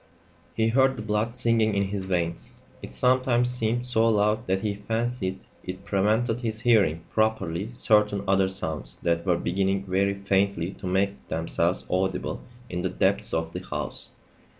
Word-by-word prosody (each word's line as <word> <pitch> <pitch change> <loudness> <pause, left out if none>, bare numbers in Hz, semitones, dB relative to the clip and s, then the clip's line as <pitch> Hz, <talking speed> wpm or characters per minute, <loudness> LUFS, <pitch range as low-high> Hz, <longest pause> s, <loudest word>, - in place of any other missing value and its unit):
He 110 0 +2
heard 130 +2 +3
the 110 - -6
blood 110 +2 -1
singing 115 -3 +2
in 100 - +2
his 100 -1 -3
veins. 85 -3 -2 0.3
It - - -8
sometimes 125 -1 +2
seemed 120 0 -1
so 115 -2 +2
loud 105 +1 +2
that 95 +1 +1
he 105 -1 -1
fancied 110 -2 -2 0.2
it 95 0 -7
prevented 110 +4 +1
his 110 -2 -2
hearing 100 -10 +3
properly 110 -3 0
certain 105 -3 +3
other 95 0 +3
sounds 80 -5 -2
that 85 +1 0
were 90 -2 +3
beginning 95 +2 0
very 100 +1 +1
faintly 100 -2 0
to 95 - -8
make 100 +2 -1
themselves 85 +2 0
audible 95 0 -1 0.3
in 90 -6 -3
the 95 - -1
depths 90 - +1
of 80 0 -2
the - - -5
house. - - -5
100 Hz, 160 wpm, -26 LUFS, 95-115 Hz, 0.3 s, heard